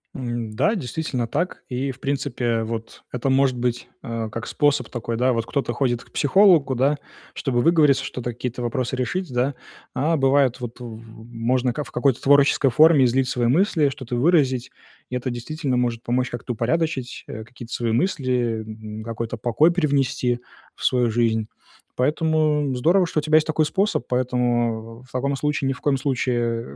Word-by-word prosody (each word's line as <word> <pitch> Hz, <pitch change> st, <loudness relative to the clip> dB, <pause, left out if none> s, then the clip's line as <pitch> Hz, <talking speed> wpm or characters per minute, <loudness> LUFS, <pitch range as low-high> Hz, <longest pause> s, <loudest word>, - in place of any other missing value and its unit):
М, 120 Hz, -3 st, -4 dB
да, 205 Hz, -, +2 dB
действительно 130 Hz, -, -3 dB
так. 170 Hz, +10 st, -3 dB
И, 130 Hz, +2 st, -2 dB
в 130 Hz, -, -14 dB
принципе, 125 Hz, -5 st, -1 dB
вот, 115 Hz, 0 st, -6 dB
это 125 Hz, +2 st, -1 dB
может 130 Hz, -1 st, +3 dB
быть, 120 Hz, 0 st, -2 dB, 0.2 s
э, 115 Hz, -1 st, -3 dB
как 115 Hz, +1 st, -6 dB
способ 145 Hz, -5 st, +1 dB
такой, 120 Hz, -1 st, -4 dB
да. 125 Hz, +2 st, +2 dB
Вот 115 Hz, -1 st, -1 dB
кто-то 140 Hz, +1 st, -2 dB
ходит 120 Hz, -3 st, 0 dB
к -, -, -24 dB
психологу, 160 Hz, -4 st, +4 dB
да, 140 Hz, +4 st, +2 dB, 0.4 s
чтобы 120 Hz, -3 st, -1 dB
выговориться, 150 Hz, -4 st, +4 dB
что-то 120 Hz, -2 st, -4 dB
какие-то 125 Hz, +1 st, -5 dB
вопросы 125 Hz, +1 st, -2 dB
решить, 175 Hz, +5 st, -2 dB
да. 125 Hz, +2 st, 0 dB, 0.4 s
А 150 Hz, +5 st, +1 dB
бывает, 135 Hz, -2 st, +3 dB
вот 120 Hz, 0 st, -7 dB
в 115 Hz, -2 st, -8 dB, 0.3 s
можно 125 Hz, +2 st, 0 dB
в 150 Hz, -, -5 dB
какой-то 130 Hz, +1 st, +1 dB
творческой 140 Hz, -1 st, +4 dB
форме 150 Hz, 0 st, +6 dB
излить 130 Hz, +1 st, +1 dB
свои 120 Hz, -1 st, 0 dB
мысли, 160 Hz, -, +3 dB
что-то 130 Hz, -3 st, -6 dB
выразить, 130 Hz, -4 st, +2 dB, 0.4 s
и 125 Hz, -, -4 dB
это 125 Hz, +1 st, -2 dB
действительно 130 Hz, +2 st, -3 dB
может 120 Hz, -1 st, -1 dB
помочь 125 Hz, +1 st, 0 dB
как-то 120 Hz, +1 st, -5 dB
упорядочить, 130 Hz, +2 st, -2 dB
э, 110 Hz, -, -7 dB
какие-то 120 Hz, -1 st, -11 dB
свои 120 Hz, -1 st, -1 dB
мысли, 125 Hz, -6 st, 0 dB
м, 110 Hz, 0 st, -8 dB
какой-то 115 Hz, +1 st, -4 dB
покой 125 Hz, +9 st, +3 dB
привнести 135 Hz, -7 st, 0 dB, 0.4 s
в -, -, -11 dB
свою 125 Hz, -2 st, +2 dB
жизнь. 110 Hz, -1 st, +1 dB, 0.5 s
Поэтому 150 Hz, 0 st, +1 dB
здорово, 175 Hz, +9 st, +3 dB
что 155 Hz, -, -1 dB
у -, -, -1 dB
тебя 155 Hz, +1 st, +4 dB
есть 155 Hz, -, +2 dB
такой 155 Hz, 0 st, +2 dB
способ. 195 Hz, -, 0 dB
Поэтому 120 Hz, -2 st, -1 dB
в 130 Hz, -, -17 dB
в -, -, -22 dB
таком 140 Hz, 0 st, 0 dB
случае 145 Hz, -1 st, -1 dB
ни -, -, +1 dB
в 125 Hz, -, -13 dB
коем 140 Hz, -2 st, +1 dB
случае, 120 Hz, -, -1 dB
125 Hz, 175 wpm, -23 LUFS, 120-145 Hz, 0.5 s, форме